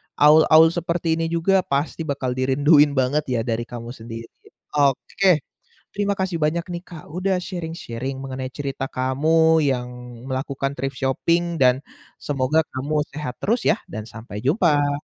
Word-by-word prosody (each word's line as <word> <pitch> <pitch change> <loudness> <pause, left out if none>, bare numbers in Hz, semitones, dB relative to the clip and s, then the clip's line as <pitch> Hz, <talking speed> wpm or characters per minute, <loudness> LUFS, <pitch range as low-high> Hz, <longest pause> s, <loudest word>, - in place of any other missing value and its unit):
awul-awul 155 +2 +6
seperti 170 -1 -1
ini 165 - 0
juga 170 +4 +2
pasti 145 +3 -2
bakal 135 -3 -2
dirinduin 145 +3 +4
banget 135 +3 +1
ya 125 -3 0
dari 115 0 -2
kamu 120 -1 -7
sendiri. 115 -1 -9 0.5
Oke, 150 +4 +2 0.5
terima 200 0 +1
kasih 190 -2 -2
banyak 160 +2 0
nih, 175 -1 -5
Kak, 165 -4 -11
sudah 185 +3 -1
sharing-sharing 160 -8 -5
mengenai 130 -1 -5
cerita 135 -1 -4
kamu 160 +5 +3
yang 125 -3 0 0.4
melakukan 135 +1 -3
thrift 135 -1 -4
shopping, 170 +6 0
dan 130 -3 +4 0.4
semoga 140 +2 +1 0.2
kamu 150 +3 0
sehat 130 -4 -6
terus 230 +4 0
ya, - - +2
dan 110 -2 -6
sampai 110 -1 -9
jumpa! 145 - +2
145 Hz, 145 wpm, -22 LUFS, 130-165 Hz, 0.5 s, awul-awul